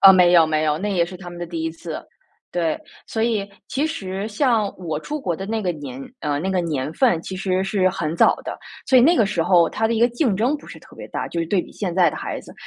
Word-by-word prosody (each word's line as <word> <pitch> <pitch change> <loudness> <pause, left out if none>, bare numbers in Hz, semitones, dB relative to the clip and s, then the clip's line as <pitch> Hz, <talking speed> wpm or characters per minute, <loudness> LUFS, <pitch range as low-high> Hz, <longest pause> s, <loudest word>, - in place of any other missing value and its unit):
呃， 195 -1 +10
没 180 -1 +6
有 170 -2 +7
没 155 0 0
有。 150 -1 +2
那 205 +2 -2
也 170 -2 +2
是 185 0 -8
他 175 -1 -9
们 175 - -9
的 175 - -4
第 165 -1 -4
一 160 - -1
次， 165 -1 -7 0.5
对。 165 -3 0 0.3
所 220 - -2
以， 215 -4 0 0.2
其 285 +4 0
实 195 -10 -4
像 225 -1 +2
我 160 -5 -3
出 300 - -5
国 175 -9 -1
的 195 - -6
那 220 0 -2
个 180 - 0
年 135 -4 -7 0.2
呃， 145 -1 -1
那 190 - -1
个 185 -1 +1
年 155 -3 -2
份 205 -10 +2
其 190 - -6
实 185 0 0
是 195 -1 +2
很 165 -2 -3
早 - - +5
的， - - -5 0.3
所 260 - +5
以 - - +7
那 335 +5 +5
个 220 - +5
时 175 -4 0
候 175 -3 +5
它 225 - 0
的 230 - 0
一 220 - 0
个 240 - +6
竞 240 -4 0
争 250 +8 +1
不 290 - -16
是 - - -10
特 - - -17
别 - - -8
大， - - -4
就 170 - -4
是 165 - -1
对 185 0 +1
比 - - -13
现 180 -5 -4
在 175 -4 +5
的 - - -7
孩 - - -4
子。 - - -13
185 Hz, 305 characters per minute, -22 LUFS, 165-220 Hz, 0.5 s, 呃